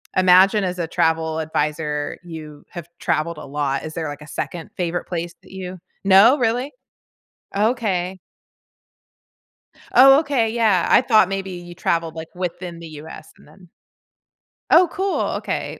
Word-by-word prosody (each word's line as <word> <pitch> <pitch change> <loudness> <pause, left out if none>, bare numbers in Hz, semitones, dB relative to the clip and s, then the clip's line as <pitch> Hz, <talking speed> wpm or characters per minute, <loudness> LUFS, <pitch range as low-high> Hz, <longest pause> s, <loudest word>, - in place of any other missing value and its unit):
imagine 185 +2 +5
as 180 -1 -3
a 165 - -2
travel 160 -1 0
adviser, 150 -1 -2
you 155 -3 -10
have 170 -2 -9
traveled 170 +2 -1
a - - -8
lot, 140 -1 -2
is 155 0 -7
there 160 -2 -3
like 145 +1 -7
a 150 - -11
second 165 +2 -5
favorite 175 -1 -2
place 170 -1 -4
that - - -18
you 185 -1 -7 0.3
No, 200 +8 +7
really? 245 +3 0 0.8
Okay. 200 -5 0 1.7
Oh, 270 +2 +8
okay, 275 -7 0
yeah. 220 -6 +2
I - - +6
thought 215 -7 +4
maybe 195 -1 -4
you 175 -1 -9
traveled, 165 -1 -1
like, 160 0 -8
within 175 -1 -5
the 165 - -9
US 155 0 -11
and - - -20
then 180 +3 -19 1.0
Oh, 350 +1 +7
cool, 385 0 -1 0.2
okay. - - -4
180 Hz, 150 wpm, -21 LUFS, 160-200 Hz, 1.7 s, Oh